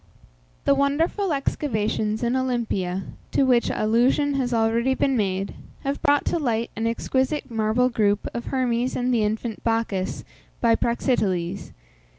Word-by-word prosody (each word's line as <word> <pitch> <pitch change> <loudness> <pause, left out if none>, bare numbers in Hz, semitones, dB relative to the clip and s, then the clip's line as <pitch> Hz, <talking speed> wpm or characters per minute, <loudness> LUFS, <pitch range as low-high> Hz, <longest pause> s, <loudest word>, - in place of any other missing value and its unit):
The 280 - +5
wonderful 310 +8 +1
excavations 220 -6 -1
in 240 +2 +1
Olympia, 225 -8 -1 0.3
to - - +3
which 245 -3 +3
allusion 245 +7 +2
has 260 -3 -1
already 230 +3 +2
been 270 0 +1
made, 195 -3 -1 0.3
have 275 +1 -2
brought 290 -2 +3
to 340 - 0
light 235 -5 -1
an 225 +1 -1
exquisite 260 +4 -1
marble 225 +3 +2
group 205 -4 +1
of 235 - -4
Hermes 250 -1 0
and 250 0 0
the 230 - +2
infant 220 +1 -2
Bacchus, 225 -5 -1 0.4
by 230 -1 +4
Praxiteles. 200 -7 -1
235 Hz, 140 wpm, -24 LUFS, 215-265 Hz, 0.4 s, The